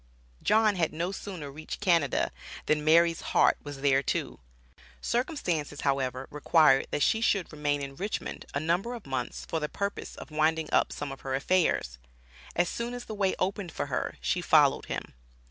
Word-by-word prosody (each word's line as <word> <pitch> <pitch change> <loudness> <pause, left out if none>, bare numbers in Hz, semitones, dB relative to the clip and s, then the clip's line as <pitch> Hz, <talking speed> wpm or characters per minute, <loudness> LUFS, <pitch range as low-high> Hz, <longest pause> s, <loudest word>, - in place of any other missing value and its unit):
John 215 -2 +3
had 165 -3 +1
no 170 +4 -2
sooner 180 -7 -6
reached 155 +3 -7
Canada 170 - +2 0.3
than 150 -1 +1
Mary's 165 +1 +4
heart - - +3
was 145 -2 -8
there 135 -1 +4
too. - - -2 0.6
Circumstances, 180 - -2
however, 135 -2 0
required 150 -2 +4
that 145 - 0
she 220 - +2
should 200 -5 +1
remain 145 -1 -1
in 135 0 -6
Richmond 200 +8 -4
a - - +2
number 175 +10 0
of 230 - -10
months 130 -3 -4
for 160 - -2
the 150 -1 -3
purpose 200 0 -4
of - - -10
winding 155 +1 +1
up - - +3
some 145 -1 -5
of 135 - -9
her 135 -1 -2
affairs. 140 - +1 0.6
As 175 +1 +2
soon 235 +5 -3
as 245 - -7
the 220 - -6
way 200 -2 +1
opened 190 -1 -2
for - - -2
her, - - -1
she - - 0
followed - - +4
him. - - -5
160 Hz, 180 wpm, -29 LUFS, 145-195 Hz, 0.6 s, Mary's